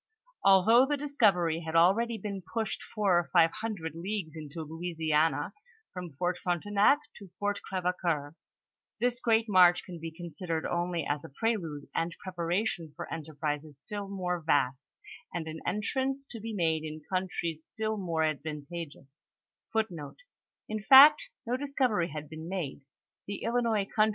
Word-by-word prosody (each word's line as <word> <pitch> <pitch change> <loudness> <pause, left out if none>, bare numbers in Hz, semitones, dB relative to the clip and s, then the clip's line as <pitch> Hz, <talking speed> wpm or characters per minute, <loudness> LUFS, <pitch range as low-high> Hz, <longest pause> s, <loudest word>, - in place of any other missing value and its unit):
Although 220 +7 +6
the 290 0 0
discovery 200 - +2
had 160 -1 -5
already 215 +8 +4
been 200 -3 -5
pushed 215 +5 -3
four 200 -5 +2
or 175 - -4
five 165 -2 +5
hundred 195 -9 -4
leagues 170 -1 -4
into 155 +1 -6
Louisiana,* 160 -1 0 0.4
from 180 -4 -7
Fort 175 +5 -1
Frontenac 200 - +3 0.2
to 200 -3 -12
Fort 205 0 -1
Crevecoeur; 175 -5 -1 0.7
this 245 +1 +1
great 225 -2 +2
march 180 -3 +6
can 175 -3 -8
be 165 +1 -5
considered 165 0 -4
only 175 -2 -1
as 145 0 -1
a - - -9
prelude 165 -4 -2
and 170 +1 -1
preparation 175 -1 -2
for - - -6
enterprises 150 -2 -4
still 205 +7 -5
more 180 -3 -2
vast, 140 -4 +1 0.4
and 165 -2 -3
an 160 0 -6
entrance 265 +6 -1
to 230 - -7
be 225 +2 -5
made 165 -6 0
in 155 0 -6
countries 175 -4 -2
still 220 +5 -3
more 170 -5 -1
advan 150 -1 -2
tageous. 145 -5 -9
175 Hz, 120 wpm, -30 LUFS, 160-205 Hz, 0.7 s, Although